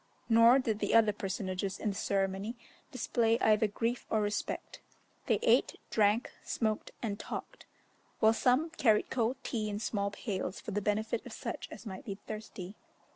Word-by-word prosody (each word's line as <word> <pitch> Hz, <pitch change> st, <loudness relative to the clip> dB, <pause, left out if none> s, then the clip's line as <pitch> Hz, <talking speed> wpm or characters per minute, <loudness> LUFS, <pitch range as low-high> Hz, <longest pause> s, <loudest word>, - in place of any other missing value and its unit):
Nor 230 Hz, +2 st, +7 dB
did 225 Hz, -5 st, 0 dB
the -, -, +1 dB
other 220 Hz, -2 st, +6 dB
personages 195 Hz, 0 st, -3 dB
in 215 Hz, -, -1 dB
the -, -, -7 dB
ceremony 195 Hz, +3 st, -1 dB, 0.4 s
display 230 Hz, -2 st, +1 dB
either 220 Hz, -2 st, +4 dB
grief 230 Hz, +4 st, -2 dB
or 220 Hz, -, +2 dB
respect; 205 Hz, 0 st, -3 dB, 0.5 s
they -, -, +3 dB
ate, -, -, +4 dB, 0.2 s
drank, 215 Hz, +2 st, +3 dB
smoked, 215 Hz, -2 st, -1 dB
and 205 Hz, -2 st, -2 dB
talked, -, -, -7 dB, 0.5 s
while 220 Hz, 0 st, +6 dB
some 255 Hz, +8 st, +2 dB
carried 230 Hz, -10 st, +2 dB
cold 245 Hz, +1 st, +1 dB
tea 215 Hz, -3 st, -2 dB
in 205 Hz, -, -3 dB
small 205 Hz, -1 st, -1 dB
pails 200 Hz, -2 st, -4 dB
for -, -, -7 dB
the 205 Hz, +1 st, -1 dB
benefit 215 Hz, +3 st, 0 dB
of -, -, -9 dB
such -, -, -5 dB
as -, -, -10 dB
might 190 Hz, -3 st, -7 dB
be 200 Hz, -, -5 dB
thirsty. 210 Hz, -3 st, -7 dB
215 Hz, 165 wpm, -32 LUFS, 200-230 Hz, 0.5 s, Nor